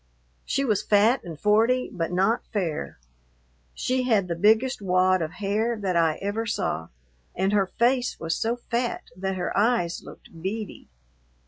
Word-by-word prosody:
She 275 - 0
was 215 -6 +1
fat 215 +5 +3
and 165 -4 -8
forty, 225 +5 +2
but 170 -3 -2
not 195 +6 +1
fair. 180 -8 -3 0.8
She 255 0 0
had 200 -5 +3
the 170 - -2
biggest 220 +7 +3
wad 185 -1 +3
of 160 +1 -3
hair 215 +4 -1
that 190 -3 -1
I 165 -2 +3
ever 215 +3 -2
saw, 80 - -2 0.5
and 190 +3 0
her 200 -2 +3
face 245 +4 +1
was 165 0 -1
so 230 +2 0
fat 240 0 -2
that 190 +1 -3
her 180 -1 -3
eyes 205 -5 +1
looked 165 - -13
beady. 205 +3 -5
205 Hz, 155 wpm, -25 LUFS, 180-230 Hz, 0.8 s, fat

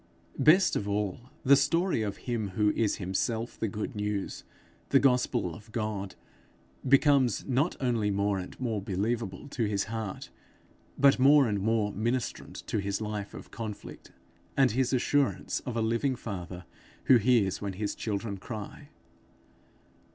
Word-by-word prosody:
Best 180 +6 +5
of 105 - -2
all, 105 +4 -2
the 140 +2 +7
story 165 +2 +2
of 100 -2 -3
him 115 -4 -1
who 105 -1 +4
is 110 -1 +1
himself 110 +5 -2
the 110 - 0
good 105 +5 -5
news, 105 -1 -3 0.5
the 140 - +5
gospel 125 -8 +2
of 105 +6 -13
God, 105 -4 -3 0.7
becomes 140 -4 +4
not 140 +6 +1
only 120 -5 +1
more 100 0 0
and 90 - -9
more 115 -5 -1
believable 100 +2 -2
to 120 -4 -1
his 100 -1 0
heart, 110 -4 -5 0.7
but 140 -1 +5
more 140 0 +6
and 105 -2 0
more 110 0 +1
ministrant 120 +4 -3
to 110 - -1
his 100 0 -2
life 105 -2 -5
of - - -11
conflict, 110 -3 -8 0.5
and 135 -2 +5
his 130 +2 +1
assurance 140 +2 +1
of 120 -2 -3
a 115 - +1
living 115 +4 +1
father 90 -6 -7 0.4
who 130 - +6
hears 115 -4 +2
when 100 -2 -3
his 100 +2 -3
children 100 -1 -3
cry. 105 +1 -8
110 Hz, 150 wpm, -29 LUFS, 100-125 Hz, 0.7 s, the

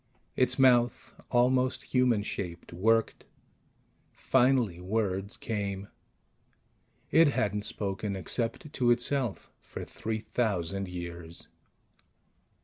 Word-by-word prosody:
Its 130 - +3
mouth, 120 -2 +3 0.2
almost 125 +1 +1
human 125 -5 +3
shaped, 90 -4 -6
worked; 115 +5 +1 0.9
finally 120 -9 +2
words 95 +1 -2
came. 100 -3 -4 1.2
It 165 0 +6
hadn't 105 -6 0
spoken, 100 0 -2
except 115 - -3
to 125 -2 +2
itself, 120 -2 +1
for - - -8
three 110 0 -4
thousand 100 -4 -1
years. 85 -1 -5
110 Hz, 90 wpm, -29 LUFS, 95-125 Hz, 1.2 s, It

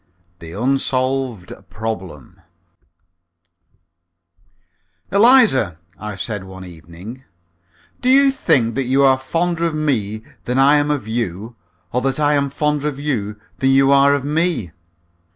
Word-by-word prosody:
THE 85 -1 -10
UNSOLVED 130 -2 -1 0.2
PROBLEM 95 - -7 2.7
"Eliza," 205 - +4 0.2
I 105 -1 -6
said 105 0 -5
one 95 0 -10
evening, 90 +9 -11 0.8
"do 250 - +1
you 275 +1 +6
think 120 - +1
that 135 +1 -2
you 135 +3 +2
are 130 -1 +4
fonder 165 +5 -1
of 165 -2 -1
me 110 -8 -1 0.2
than 125 +1 -1
I 140 +2 +5
am 145 0 0
of 145 -5 -2
you, 110 0 -4 0.4
or 125 - +1
that 135 +2 -1
I 150 0 +2
am 140 -1 +1
fonder 150 +1 -1
of 145 -2 -4
you 105 -8 -3 0.2
than 135 - +2
you 135 0 +4
are 140 +1 +5
of 140 -1 -4
me?" 150 - -1
130 Hz, 135 wpm, -19 LUFS, 105-145 Hz, 2.7 s, you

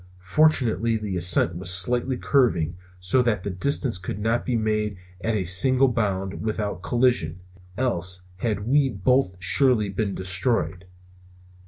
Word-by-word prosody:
Fortunately 115 -1 +2
the 105 -3 -5
ascent 85 -1 +1
was 90 0 -3
slightly 120 +8 +1
curving, 90 - +1 0.2
so 90 +8 +1
that 110 -6 -1
the 100 - -4
distance 120 +2 -1
could 95 +1 -6
not 115 +3 -1
be 125 - 0
made 105 -2 -1 0.3
at 115 0 -1
a 100 - -1
single 130 +10 +4
bound 95 -5 -2
without 105 -3 -3
collision, 120 -7 0 0.4
else 90 -8 -1
had 105 0 -3
we 140 +1 +3
both 115 -1 0
surely 110 +4 +3
been 100 0 -3
destroyed. 95 -2 0
105 Hz, 140 wpm, -23 LUFS, 90-125 Hz, 0.4 s, single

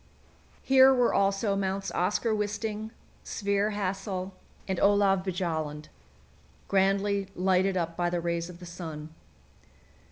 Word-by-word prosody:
Here 265 0 +7
were 250 -2 +3
also 195 +1 +1
Mounts 195 0 -2
Oskar 210 +5 0
Wisting, 210 +1 -3 0.3
Sverre 200 0 0
Hassel, 195 -2 -3 0.3
and 190 -2 -1
Olav 200 -1 +4
Bjaaland, 160 -5 -3 0.8
grandly 195 0 +1
lighted 185 +1 +2
up 170 -1 -2
by 175 0 0
the 175 0 -1
rays 170 0 -2
of 175 -1 -11
the 180 - -10
sun. 160 -3 -8
195 Hz, 120 wpm, -28 LUFS, 175-205 Hz, 0.8 s, Here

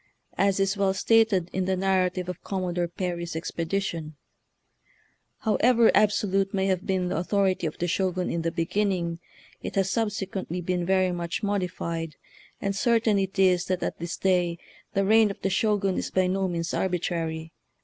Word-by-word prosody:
As 195 -1 +2
is 195 +1 +2
well 195 -1 +2
stated 210 -4 +3
in 190 -1 0
the 190 0 0
narrative 185 -1 +1
of 180 - -6
Commodore 180 -2 -2
Perry's 170 -1 -4
ex 160 - -4
pedition, 165 -2 -2 1.3
"However 230 +1 +4
absolute 195 -2 +2
may 190 0 +1
have 190 -1 0
been 185 -2 0
the - - -1
authority 185 0 +1
of 155 - -6
the 175 - -1
Shogun 185 0 0
in 170 - -1
the 165 - 0
beginning, 170 -1 -1 0.4
it - - -6
has 195 -1 +1
subsequently 195 -5 -2
been 175 0 -2
very 185 -1 +3
much 170 +1 -3
modified; 170 -5 -2 0.4
and 200 0 -2
certain 225 -3 +2
it 195 0 -3
is 185 -2 +4
that 185 -1 -1
at - - -3
this 170 +1 -4
day 180 -3 +1 0.4
the 195 0 +2
reign 220 +1 +5
of 200 - -6
the 195 - +1
Shogun 200 -1 +1
is - - -3
by 185 0 +2
no 190 +1 0
means 170 -2 -3
arbitrary. 165 -3 -2
185 Hz, 170 wpm, -26 LUFS, 175-195 Hz, 1.3 s, reign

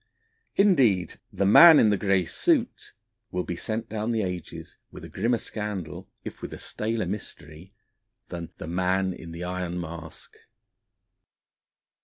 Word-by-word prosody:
Indeed, 125 - +3
the 100 - -1
Man 160 - +9
in 110 - +5
the - - +3
Grey 95 -2 +1
Suit 250 - 0 0.4
will 90 0 -2
be 90 - -4
sent 110 +5 -4
down 110 0 -3
the 115 -2 0
ages 90 -3 -6 0.2
with - - -11
a - - -10
grimmer 115 +5 0
scandal, 105 -7 -6 0.2
if - - -8
with - - -6
a - - -9
staler 110 -1 -3
mystery, 90 -3 -8 0.6
than 85 -2 -6
the - - -7
Man 95 +2 0
in 85 -1 -10
the 85 +2 -7
Iron 90 -1 -3
Mask. 80 -1 -9
95 Hz, 145 wpm, -26 LUFS, 90-110 Hz, 0.6 s, Man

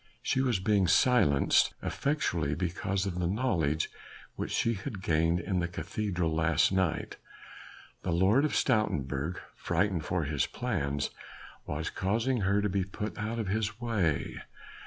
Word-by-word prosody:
She 130 - +1
was 125 -7 +1
being 100 -1 +2
silenced 85 - +4
effectually 85 - 0
because 95 +3 -1
of 90 -2 -3
the 90 - +1
knowledge 85 - 0 0.4
which - - -4
she 115 - +1
had 100 -1 -6
gained 80 +1 +2
in 90 +1 -1
the 85 - 0
cathedral 90 -1 -2
last 80 +1 +3
night. 95 -4 0 0.8
The - - -4
Lord 95 +10 +4
of 155 - 0
Stoutenburg, 80 - 0 0.2
frightened 90 -1 0
for 85 +1 -1
his 70 -3 0
plans, 70 +1 -2 0.6
was 75 +2 -3
causing 115 +6 0
her 100 +1 +2
to - - +2
be 95 0 0
put 105 +1 -5
out 110 +3 -2
of 110 -4 -2
his 105 +1 -1
way. 100 - 0
95 Hz, 145 wpm, -30 LUFS, 80-105 Hz, 0.8 s, silenced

